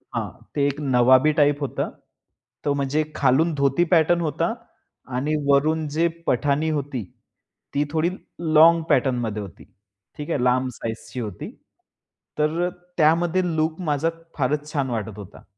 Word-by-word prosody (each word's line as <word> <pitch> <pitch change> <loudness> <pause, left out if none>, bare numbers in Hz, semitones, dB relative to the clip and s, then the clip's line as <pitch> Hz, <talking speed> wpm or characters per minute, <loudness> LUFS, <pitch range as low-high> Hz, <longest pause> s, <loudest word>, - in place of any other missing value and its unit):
हां, - - -2 0.2
ते 140 -1 +1
एक 145 +1 -3 0.2
नवाबी 130 +5 +5
टाइप 145 0 +3
होतं. 140 - -2 0.7
तो 145 - +2
म्हणजे 140 +2 0
खालून 145 +5 +3
धोती 140 +4 +2
पॅटर्न 170 +1 +4
होता 165 +6 -1 0.6
आणि 150 +4 0
वरून 150 +3 +2
जे 170 +1 +3 0.2
पठाणी 140 +5 +1
होती, 135 -5 -4 0.7
ती 145 +1 +2
थोडी 160 +2 +1 0.4
लोंग 165 +2 +7
पॅटर्न 130 -3 +2
मध्ये 105 -1 -3
होती. 95 -5 -10 0.5
ठीक 150 +1 -6
आहे 140 -6 0
लांब 130 +1 +2
साइजची 115 +2 -6
होती. 105 -6 -6 0.9
तर 155 +3 +1
अ, - - -2 0.3
त्यामध्ये 170 +3 +3
लुक 160 +1 0
माझा 155 0 0 0.3
फारच 150 +2 -1
छान 135 -3 0
वाटत 110 -3 -4
होता. 100 -3 -11
145 Hz, 145 wpm, -23 LUFS, 130-160 Hz, 0.9 s, लोंग